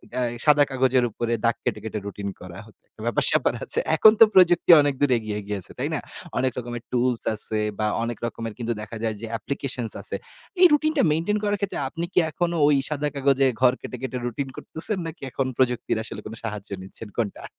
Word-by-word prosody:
অ্যা 125 Hz, -, 0 dB, 0.2 s
সাদা 150 Hz, -1 st, +6 dB
কাগজের 130 Hz, -1 st, +2 dB
উপরে 120 Hz, +2 st, -2 dB
দাগ 115 Hz, -, +3 dB
কেটে, 105 Hz, -, -1 dB
কেটে 110 Hz, -1 st, -4 dB
routine 100 Hz, 0 st, -5 dB
করা 90 Hz, -1 st, -10 dB
হ -, -, -17 dB, 0.4 s
ব্যাপার 120 Hz, -, +1 dB
স্যাপার -, -, +2 dB
আছে -, -, +1 dB, 0.2 s
এখন 215 Hz, +6 st, +8 dB
তো -, -, +11 dB
প্রযুক্তি 175 Hz, -1 st, +6 dB
অনেকদূর 145 Hz, -1 st, +1 dB
এগিয়ে 110 Hz, -2 st, -4 dB
গিয়েছে। 100 Hz, -3 st, -5 dB
তাই -, -, -2 dB
না? -, -, 0 dB, 0.4 s
অনেক 130 Hz, 0 st, +1 dB
রকমের 120 Hz, -1 st, -5 dB
tools 125 Hz, -1 st, +1 dB
আছে 110 Hz, 0 st, -1 dB, 0.2 s
বা 105 Hz, -, +1 dB, 0.2 s
অনেক 115 Hz, 0 st, -3 dB
রকমের 115 Hz, -1 st, -5 dB
কিন্তু 120 Hz, 0 st, -1 dB
দেখা 110 Hz, +2 st, -8 dB
যায় 110 Hz, -1 st, 0 dB
যে 115 Hz, -, -5 dB
applications 125 Hz, -1 st, -4 dB
আছে। -, -, -4 dB, 0.5 s
এই -, -, +10 dB
routine 310 Hz, +1 st, +2 dB
টা -, -, +4 dB
maintain 170 Hz, +7 st, +1 dB
করার 205 Hz, 0 st, +1 dB
ক্ষেত্রে 200 Hz, -2 st, -3 dB
আপনি 165 Hz, +4 st, -4 dB
কি -, -, +5 dB
এখনো 170 Hz, +1 st, -1 dB
ওই 150 Hz, -, +5 dB
সাদা 150 Hz, -1 st, -1 dB
কাগজে 140 Hz, -1 st, +3 dB, 0.2 s
ঘর 125 Hz, -1 st, +6 dB
কেটে, 125 Hz, -, -7 dB
কেটে 130 Hz, -1 st, -3 dB
routine 130 Hz, +3 st, -3 dB
করতেছেন 175 Hz, +6 st, -2 dB
নাকি 165 Hz, +1 st, -9 dB
এখন 135 Hz, -1 st, -1 dB
প্রযুক্তির 125 Hz, -3 st, +1 dB
আসলে -, -, -8 dB
কোনো 110 Hz, +1 st, -7 dB
সাহায্য 105 Hz, -2 st, -5 dB
নিচ্ছেন 95 Hz, +4 st, -10 dB
কোনটা? 110 Hz, -4 st, -2 dB
125 Hz, 200 wpm, -24 LUFS, 110-150 Hz, 0.5 s, তো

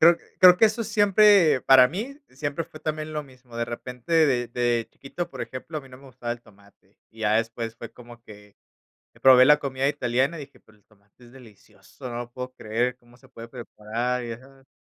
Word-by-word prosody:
Creo 170 Hz, +1 st, +7 dB, 0.2 s
creo 180 Hz, -1 st, +9 dB
que 220 Hz, -, +5 dB
eso 220 Hz, +2 st, -2 dB
es 215 Hz, -, -7 dB
siempre, 205 Hz, -, +4 dB
para 130 Hz, -1 st, +7 dB
mí, 230 Hz, -, -6 dB
siempre 145 Hz, +4 st, -4 dB
fue 155 Hz, -, -14 dB
también 155 Hz, 0 st, -4 dB
lo 150 Hz, -1 st, -3 dB
mismo, 130 Hz, -3 st, -16 dB
de 115 Hz, -, -1 dB
repente, 125 Hz, +5 st, -8 dB
de 120 Hz, -3 st, 0 dB
de 120 Hz, -1 st, -1 dB
chiquito, 170 Hz, +5 st, -7 dB
por -, -, -9 dB
ejemplo, 150 Hz, +5 st, -6 dB
a -, -, -9 dB
mí 135 Hz, -, -16 dB
no 125 Hz, -, -13 dB
me 135 Hz, -, -18 dB
gustaba 120 Hz, -2 st, -6 dB
el 120 Hz, 0 st, -10 dB
tomate, 100 Hz, 0 st, -24 dB
y 115 Hz, -, -17 dB
ya 105 Hz, -1 st, +1 dB
después 115 Hz, 0 st, -3 dB
fue 115 Hz, -, -10 dB
como 120 Hz, -1 st, -15 dB
que 105 Hz, -3 st, -16 dB, 0.6 s
que -, -, -23 dB
probé 130 Hz, -1 st, +7 dB
la 150 Hz, +2 st, +6 dB
comida 135 Hz, -1 st, -2 dB
italiana 135 Hz, +4 st, -1 dB
y -, -, -7 dB
dije: -, -, -24 dB
"Pero 110 Hz, -, -24 dB
el 100 Hz, -, -36 dB
tomate 105 Hz, +3 st, -25 dB
es 120 Hz, -, -18 dB
delicioso, 125 Hz, 0 st, -14 dB
no 120 Hz, -, -6 dB
lo 120 Hz, 0 st, -7 dB
puedo 125 Hz, +1 st, -7 dB
creer, 120 Hz, +2 st, -2 dB
cómo 120 Hz, -1 st, -23 dB
se 135 Hz, -, -21 dB
puede 115 Hz, -3 st, -11 dB
preparar", 120 Hz, +1 st, -4 dB
ya 115 Hz, -1 st, -6 dB
sabes. 135 Hz, +1 st, -20 dB
125 Hz, 225 wpm, -24 LUFS, 115-145 Hz, 0.6 s, creo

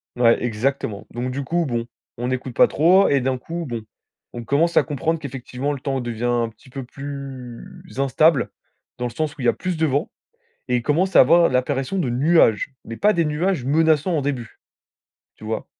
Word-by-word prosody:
Ouais, 120 Hz, -1 st, +4 dB
exactement. 120 Hz, -2 st, -2 dB
Donc 125 Hz, +2 st, -3 dB
du 140 Hz, +2 st, -3 dB
coup, 170 Hz, +5 st, 0 dB
bon, 120 Hz, -4 st, -2 dB, 0.3 s
on 120 Hz, +2 st, -2 dB
écoute 130 Hz, -1 st, -4 dB
pas -, -, +6 dB
trop 185 Hz, +6 st, +4 dB
et 140 Hz, -1 st, +3 dB
d'un 130 Hz, +1 st, 0 dB
coup, 170 Hz, +6 st, -5 dB
bon, 120 Hz, -3 st, -4 dB, 0.5 s
on 120 Hz, -, -6 dB
commence 150 Hz, +8 st, +1 dB
à -, -, +6 dB
comprendre 160 Hz, +2 st, -2 dB
qu'effectivement 135 Hz, -1 st, -4 dB
le 140 Hz, -, -4 dB
temps 135 Hz, 0 st, -2 dB
devient 120 Hz, -1 st, -5 dB
un 120 Hz, -1 st, +1 dB
petit 115 Hz, +4 st, -20 dB
peu 135 Hz, +1 st, -6 dB
plus 135 Hz, -2 st, -8 dB, 0.4 s
instable, 140 Hz, +1 st, +3 dB, 0.5 s
dans 125 Hz, -, -3 dB
le 120 Hz, -, -3 dB
sens 155 Hz, 0 st, -2 dB
où -, -, -7 dB
il -, -, -3 dB
y -, -, +4 dB
a -, -, +4 dB
plus 185 Hz, -2 st, -3 dB
de 160 Hz, -, +2 dB
vent 145 Hz, +1 st, 0 dB, 0.6 s
et 125 Hz, -, +2 dB
il 120 Hz, -, -1 dB
commence 170 Hz, +9 st, +1 dB
à -, -, +9 dB
avoir 170 Hz, +6 st, +6 dB
l'apparition 130 Hz, +6 st, -1 dB
de 145 Hz, -9 st, 0 dB
nuages, 135 Hz, -3 st, +3 dB
mais 115 Hz, -, -7 dB
pas 210 Hz, -, +3 dB
des 170 Hz, -4 st, +1 dB
nuages 155 Hz, 0 st, -1 dB
menaçants, 160 Hz, +3 st, +2 dB
au -, -, +1 dB
début. 130 Hz, -5 st, -4 dB, 0.8 s
Tu -, -, -16 dB
vois? 110 Hz, 0 st, -3 dB
135 Hz, 205 wpm, -22 LUFS, 120-160 Hz, 0.8 s, à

